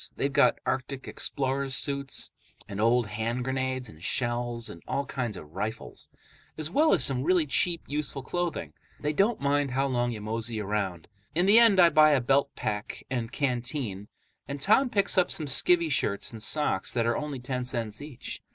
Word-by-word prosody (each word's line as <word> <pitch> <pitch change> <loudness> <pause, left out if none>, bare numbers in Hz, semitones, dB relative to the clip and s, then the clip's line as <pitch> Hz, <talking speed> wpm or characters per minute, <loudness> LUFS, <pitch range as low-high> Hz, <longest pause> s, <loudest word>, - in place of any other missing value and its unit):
They've 140 0 -1
got - - +4
arctic 130 +1 -3
explorers' 135 -1 -2
suits 140 -1 -2 0.4
and 100 0 -4
old 120 +1 +3
hand 115 +4 -2
grenades 130 -1 -1
and 80 -5 -14
shells 120 +2 0
and 85 - -10
all 140 - -1
kinds 120 -6 -3
of 75 - -11
rifles, 105 +6 -5 0.5
as 155 0 -3
well 310 - +4
as 160 - +3
some 125 -1 +1
really 175 0 +3
cheap, 170 +4 +1
useful 145 -2 -3
clothing. 175 +4 -3 0.3
They 150 +1 -1
don't 205 +8 +2
mind 140 0 +1
how 135 +2 0
long 120 -2 0
you 110 - -5
mosey 110 +1 -3
around. 100 -5 -2 0.3
In 175 +2 +3
the 210 +4 +7
end 225 -5 +6
I 170 -1 +8
buy 155 -1 +6
a 140 - +4
belt 135 +3 +2
pack 105 -1 -4
and 120 -3 -2
canteen, 125 -6 -2 0.4
and 140 0 -5
Tom 220 - +4
picks 200 -3 +3
up 180 - +3
some 155 - -4
skivvy 165 +4 +2
shirts 100 -6 0
and 115 -2 -9
socks 150 -5 0
that 115 -2 +1
are 115 0 +1
only 150 -2 -3
ten 125 0 -3
cents 120 -2 -3
each. 145 -4 -7
130 Hz, 185 wpm, -28 LUFS, 115-150 Hz, 0.5 s, I